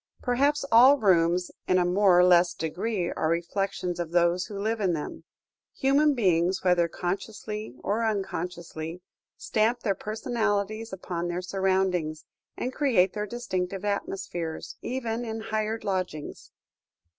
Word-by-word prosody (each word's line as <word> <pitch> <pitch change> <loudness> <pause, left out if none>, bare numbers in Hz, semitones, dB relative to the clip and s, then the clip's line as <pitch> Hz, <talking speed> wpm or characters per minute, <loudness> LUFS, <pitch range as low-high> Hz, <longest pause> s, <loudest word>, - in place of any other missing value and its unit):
Perhaps 280 +4 +2
all 255 +5 +8
rooms 180 -5 +2 0.2
in 185 - +3
a 180 - +3
more 185 0 +4
or 180 - +7
less 175 -1 +5
degree 180 +3 -2
are 155 - -1
reflections 175 +1 -2
of 170 -2 -2
those 175 +1 +2
who 205 - -7
live 220 +2 -1
in 185 -3 +2
them: 150 -2 -5 0.5
human 280 +2 +3
beings, 185 -4 +2
whether 180 -2 +3
consciously 205 - -5
or 215 +3 0
unconsciously, 175 -5 -3 0.4
stamp 230 +3 +1
their 200 - +1
personalities 215 0 -2
upon 175 -2 -4
their 175 +1 -3
surroundings, 185 -4 0 0.3
and 255 - -3
create 225 -12 +3
their 210 0 -3
distinctive 195 -4 -3
atmospheres, 180 -5 -3
even 235 -2 -3
in 225 -1 -4
hired 220 0 -2
lodgings. 185 -6 -4
190 Hz, 135 wpm, -27 LUFS, 175-220 Hz, 0.5 s, all